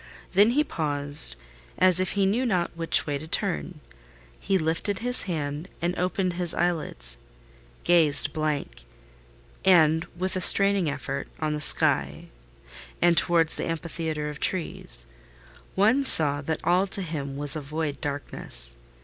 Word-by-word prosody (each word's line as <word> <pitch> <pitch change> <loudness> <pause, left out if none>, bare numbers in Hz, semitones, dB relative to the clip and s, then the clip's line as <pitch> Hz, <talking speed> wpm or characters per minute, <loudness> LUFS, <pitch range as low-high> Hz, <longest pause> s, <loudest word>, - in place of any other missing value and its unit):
Then 205 +4 +4
he 300 - +4
paused, 145 - +1 0.4
as 185 0 +4
if 185 -1 -1
he 200 -1 +1
knew 215 +7 0
not 180 -10 -1
which 165 -1 +1
way 145 -2 -3
to 155 - -9
turn. 175 -3 -2 0.6
He 195 - 0
lifted 165 +4 -2
his 245 +3 -1
hand 150 +1 -4
and 175 +2 -2
opened 180 0 -1
his 175 -1 -1
eyelids; 165 - -3 0.7
gazed 155 -4 +3
blank, 145 - -4 0.8
and 160 -3 +4
with 185 +2 -2
a 185 - -2
straining 195 -3 +6
effort, 140 -1 -5
on 155 -1 -2
the 150 - -4
sky, - - +3 0.7
and 175 0 +3
toward 165 -1 +2
the - - -4
amphitheatre 160 -2 -4
of 150 0 -7
trees: - - -1 0.7
one 220 +8 +3
saw 145 - +2
that 155 +2 -4
all 180 +3 +2
to 195 0 -2
him 140 -5 -5
was 145 0 +2
void 155 -1 -4
darkness. - - -2
165 Hz, 140 wpm, -25 LUFS, 145-185 Hz, 0.8 s, straining